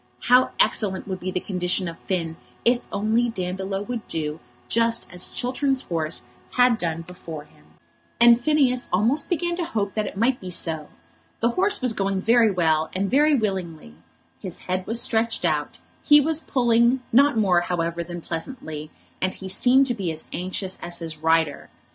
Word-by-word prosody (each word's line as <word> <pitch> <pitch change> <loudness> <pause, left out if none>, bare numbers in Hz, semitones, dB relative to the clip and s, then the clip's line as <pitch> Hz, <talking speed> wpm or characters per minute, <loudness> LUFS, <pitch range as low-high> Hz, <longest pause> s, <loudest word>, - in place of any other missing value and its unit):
How 250 +1 +6
excellent 195 -3 +1
would 190 -2 -4
be 185 - -4
the 185 - -1
condition 180 0 -1
of 165 0 -7
Finn 165 -4 -2 0.3
if 240 +1 +3
only 220 +4 +1
Dandolo 190 -1 -3
would 235 0 -5
do 155 -1 -3 0.3
just 230 0 +1
as 180 0 -1
Chiltern's 265 +1 -1
horse 160 -4 -2 0.3
had 245 -2 +4
done 165 -1 -2
before 165 -3 -9
him! 110 - -24 0.5
And 235 0 +7
Phineas 260 -3 +2
almost 230 +11 +1
began 345 -1 0
to 355 - -1
hope 205 - -2
that 215 -2 -1
it - - -8
might 245 +4 +2
be 185 - -6
so. 160 -3 -2 0.5
The 230 - +2
horse 385 +7 +1
was 250 -3 +1
going 195 -2 -1
very 230 +2 +4
well, 160 -4 +1
and 195 +1 -1
very 295 +3 +4
willingly. 185 - -3 0.5
His 185 -3 -5
head 185 0 -3
was 230 +1 0
stretched 225 -4 +1
out, 150 -3 -1 0.2
he 295 0 +7
was 315 +2 +1
pulling, 240 -1 +2
not 280 +1 +5
more, 185 -5 +3
however, 170 -1 -2
than 175 0 -7
pleasantly, 160 - -6 0.3
and 185 0 -1
he 190 - -8
seemed 250 +8 +4
to 250 - -1
be 190 -7 -3
as 160 0 -6
anxious 185 +1 -4
as 175 0 -2
his 165 -2 -6
rider. 160 -1 +1
195 Hz, 175 wpm, -24 LUFS, 170-240 Hz, 0.5 s, And